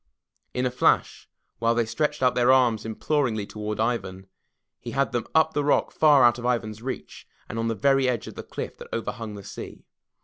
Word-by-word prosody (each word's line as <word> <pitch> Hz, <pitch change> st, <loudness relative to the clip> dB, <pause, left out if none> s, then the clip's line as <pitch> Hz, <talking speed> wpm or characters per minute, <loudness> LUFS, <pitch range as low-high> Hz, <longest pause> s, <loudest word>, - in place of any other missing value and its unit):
In 125 Hz, 0 st, 0 dB
a 125 Hz, -, 0 dB
flash, 125 Hz, -, +1 dB, 0.3 s
while 115 Hz, 0 st, +2 dB
they 120 Hz, -1 st, +2 dB
stretched 150 Hz, +4 st, -1 dB
out 125 Hz, -, +4 dB
their 125 Hz, +1 st, +4 dB
arms 120 Hz, -5 st, +3 dB
imploringly 110 Hz, -1 st, -1 dB
toward 105 Hz, +1 st, -5 dB
Ivan, 110 Hz, -5 st, -2 dB, 0.5 s
he -, -, -7 dB
had 135 Hz, -3 st, +2 dB
them 120 Hz, -1 st, -2 dB
up 160 Hz, 0 st, +4 dB
the 145 Hz, -, 0 dB
rock 145 Hz, -, +2 dB
far 145 Hz, -4 st, +5 dB
out 120 Hz, 0 st, +5 dB
of 120 Hz, -, -6 dB
Ivan's 110 Hz, -3 st, -3 dB
reach, 130 Hz, +2 st, -7 dB, 0.2 s
and 115 Hz, -, -5 dB
on 115 Hz, -, 0 dB
the 115 Hz, -, -1 dB
very 135 Hz, +4 st, +3 dB
edge 120 Hz, -3 st, -2 dB
of -, -, -8 dB
the -, -, -7 dB
cliff -, -, -7 dB
that -, -, -10 dB
overhung 115 Hz, -1 st, -4 dB
the 100 Hz, -, -9 dB
sea. -, -, -9 dB
120 Hz, 205 wpm, -25 LUFS, 110-130 Hz, 0.5 s, far